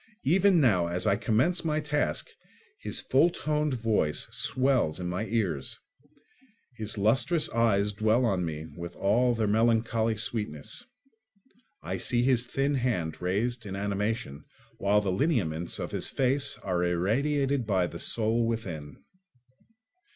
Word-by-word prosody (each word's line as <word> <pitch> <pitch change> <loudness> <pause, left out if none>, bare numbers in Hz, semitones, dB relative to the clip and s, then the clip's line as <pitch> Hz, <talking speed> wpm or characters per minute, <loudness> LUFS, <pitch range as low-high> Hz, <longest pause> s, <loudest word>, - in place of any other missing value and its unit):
Even 185 +4 +4
now, 95 - +3
as 90 +1 -1
I 100 - +3
commence 120 - +1
my 155 -2 0
task, 150 - -1 0.5
his - - -2
full 140 +6 +3
toned 150 -4 -1
voice 110 -10 0
swells 130 - 0
in 90 - -3
my 90 +5 -3
ears; 95 - -1 1.0
his 110 -1 -4
lustrous 120 - +2
eyes 105 -3 +2
dwell 110 +4 +2
on 95 -6 +1
me 80 -2 -4
with 85 0 -7
all 120 +5 +2
their 110 -1 0
melancholy 110 +1 +2
sweetness; 110 - -3 1.0
I - - -3
see 120 -1 0
his 125 -2 +2
thin 135 +3 0
hand 115 - -1
raised 115 +7 -1
in 95 - -5
animation, 100 -6 -2 0.4
while 100 +1 +3
the 100 -2 -1
lineaments 90 - 0
of - - -5
his - - -1
face 135 +1 +1
are 90 -2 0
irradiated 130 - 0
by 95 -4 +2
the 85 -1 -7
soul 115 +1 0
within. 85 -11 -5
110 Hz, 135 wpm, -28 LUFS, 95-130 Hz, 1.0 s, Even